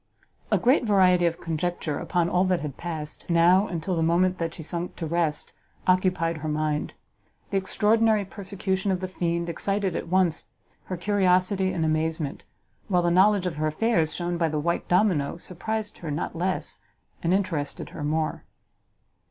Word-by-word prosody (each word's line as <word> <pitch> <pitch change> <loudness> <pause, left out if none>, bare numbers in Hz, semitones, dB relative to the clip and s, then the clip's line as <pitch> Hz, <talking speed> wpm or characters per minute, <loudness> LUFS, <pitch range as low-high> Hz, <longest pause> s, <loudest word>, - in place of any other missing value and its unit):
A - - +3
great 255 +3 +3
variety 185 -5 +4
of 165 0 -2
conjecture 165 -2 -2
upon 175 -2 0
all 180 +1 +2
that 185 -2 +1
had 145 -3 -5
passed, 155 -3 -6
now, 175 +4 +5
and 165 -3 -4
till 185 +1 -1
the 165 - 0
moment 180 +3 +2
that 165 -1 -1
she 160 - -7
sunk 170 +3 -4
to 165 - -4
rest, 165 -1 -1 0.3
occupied 180 -3 +2
her 155 0 -5
mind; 150 0 -1 0.6
the 195 - +2
extraordinary 215 +2 +2
persecution 195 0 -3
of 185 -2 +1
the 185 - -3
fiend 170 -2 -2
excited 195 +2 -1
at - - -3
once 180 -2 +1 0.4
her 185 - -4
curiosity 185 0 +2
and 170 -3 -1
amazement, 155 -1 -1 0.4
while 180 -3 +2
the 175 - +2
knowledge 190 +1 +4
of 170 -4 -2
her 155 0 0
affairs 160 0 +1
shown 175 -1 -2
by 165 -2 +2
the 155 - -2
white 170 +3 -1
domino 175 -6 +2
surprised 210 +5 -4
her 165 - -6
not 150 +3 -3
less, 180 +3 -2 0.4
and 170 - 0
interested 175 -7 -1
her 150 - -7
more. 155 +1 -1
175 Hz, 170 wpm, -26 LUFS, 160-190 Hz, 0.6 s, now